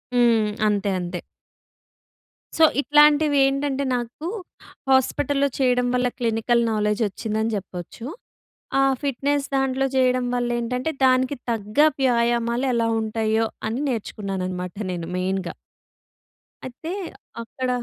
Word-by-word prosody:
హ్మ్. 230 -3 +4 0.2
అంతే, 205 -1 +1
అంతే. 175 0 -4 1.4
సో, 325 - +5 0.2
ఇట్లాంటివేంటంటే, 290 -2 +3
నాకు 245 +7 -5 0.6
హాస్పటల్‌లో 275 +2 +2
చెయ్యడం 250 -2 +2
వల్ల 250 0 +2
క్లినికల్ 235 +1 +1
నాలెడ్జొచ్చిందని 215 +1 -1
జెప్పచ్చు. 190 +3 -7 0.8
ఆహ్, 270 0 +3
ఫిట్‌నెస్ 285 +1 0
దాంట్లో 270 0 +1
జెయడం 255 -1 +2
వల్లేంటంటే, 245 +4 -1
దానికి 255 +1 +3
తగ్గ 210 +3 -5 0.2
వ్యాయామాలు 235 0 +1
ఎలా 230 -1 +1
ఉంటాయ్యో, 220 0 0 0.2
అని 245 +6 -2
నేర్చుకున్నాననమాట 190 -5 -4 0.2
నేను 170 -1 -5
మెయిన్‌గా. 185 0 -2 1.1
అయితే, 260 +6 -8 0.5
అక్కడ 255 +2 -4
240 Hz, 95 wpm, -23 LUFS, 215-270 Hz, 1.4 s, సో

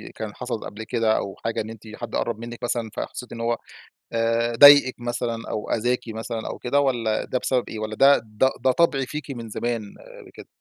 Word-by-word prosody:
كان - - -6
حصل - - -4
قبل 110 +2 -7
كده 115 -1 +1
أو 95 - -4
حاجة 115 - 0
إن 110 - -7
أنتِ 115 -1 -10
حد 120 -2 -6
قرب 115 -2 -1
منِك 120 0 -8
مثلًا، 120 -2 -1
فحسيتِ 125 - -6
إنّه 115 - -5
هو 115 0 +1 0.6
آآ 115 +1 +1
ضايقِك 145 0 +9
مثلًا 120 -1 -2
أو 105 - -4
أذاكِ 120 +2 +1
مثلًا 110 0 -5
أو - - -5
كده، 135 +3 +1
والَّا 120 -6 0
ده 130 - -1
بسبب 125 -1 +1
إيه؟ 110 - -6
والَّا 110 0 -4
ده 140 +4 +6
ده 110 +4 +1
ده 130 - +3
طبع 140 -3 +2
فيكِ 150 0 -6
من 115 -4 -7
زمان 115 -2 -3 0.4
كده؟ - - -12
115 Hz, 205 wpm, -24 LUFS, 110-125 Hz, 0.6 s, ضايقِك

